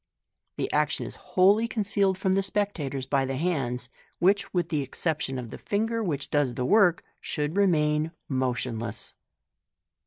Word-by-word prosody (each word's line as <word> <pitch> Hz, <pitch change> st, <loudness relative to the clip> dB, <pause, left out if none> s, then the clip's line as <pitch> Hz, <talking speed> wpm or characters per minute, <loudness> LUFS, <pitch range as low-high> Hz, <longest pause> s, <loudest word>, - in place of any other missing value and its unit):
The -, -, -2 dB
action -, -, +1 dB
is -, -, -7 dB, 0.2 s
wholly 205 Hz, +5 st, +5 dB
concealed 200 Hz, -4 st, +1 dB
from 190 Hz, 0 st, +1 dB
the 195 Hz, -, +3 dB
spectators 175 Hz, -10 st, -2 dB
by 135 Hz, 0 st, +1 dB
the 135 Hz, 0 st, -2 dB
hands, 135 Hz, -7 st, -1 dB, 0.3 s
which, 195 Hz, +3 st, +2 dB
with 175 Hz, -2 st, 0 dB
the 150 Hz, -3 st, 0 dB
exception 140 Hz, 0 st, -2 dB
of 120 Hz, -3 st, -6 dB
the -, -, -8 dB
finger 225 Hz, +3 st, -1 dB
which 150 Hz, -9 st, -3 dB
do^s 145 Hz, -4 st, +1 dB
the 125 Hz, -, -1 dB
work, 180 Hz, +1 st, +4 dB, 0.2 s
should 150 Hz, +2 st, -3 dB
remain 155 Hz, -5 st, +2 dB, 0.2 s
motionless. 125 Hz, -4 st, -2 dB
155 Hz, 150 wpm, -27 LUFS, 135-195 Hz, 0.3 s, wholly